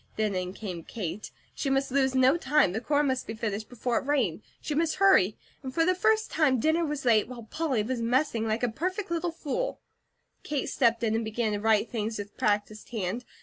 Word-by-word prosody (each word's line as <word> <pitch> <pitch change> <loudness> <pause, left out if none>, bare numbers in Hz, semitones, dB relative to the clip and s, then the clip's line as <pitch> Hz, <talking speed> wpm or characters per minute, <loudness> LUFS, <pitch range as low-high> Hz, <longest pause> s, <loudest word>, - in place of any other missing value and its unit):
Then 215 -2 0
in 185 0 -3
came 180 -6 -6
Kate. 200 -1 -5 0.2
She 275 - -2
must 270 0 +1
lose 265 -1 +2
no 260 +3 +5
time, 295 - +3
the 220 +4 -3
corn 295 +2 +2
must 260 -2 -1
be 220 - -5
finished 215 -1 -3
before 245 0 -1
it - - -10
rained. 250 - +1 0.2
She 300 - -4
must 320 +2 +1
hurry 375 - +4 0.3
for 330 +5 +2
the 370 - +4
first 435 +4 +2
time 275 -6 +3
dinner 315 +6 +2
was 295 -4 -3
late, 220 -3 +4
while 245 -1 -8
Polly 265 -1 -1
was 240 +2 -2
messing 235 -1 +1
like 220 +2 -1
a 245 - +2
perfect 370 - -3
little 340 +1 0
fool. 340 - -3 0.6
Kate 290 -3 -2
stepped 235 -4 +2
in 220 -1 +1
and 225 +1 0
began 220 0 -1
to 205 - -1
right 220 +1 +3
things 220 -1 -3
with 205 0 -7
practised 210 +1 -1
hand. 220 +2 -3
245 Hz, 210 wpm, -28 LUFS, 215-295 Hz, 0.6 s, no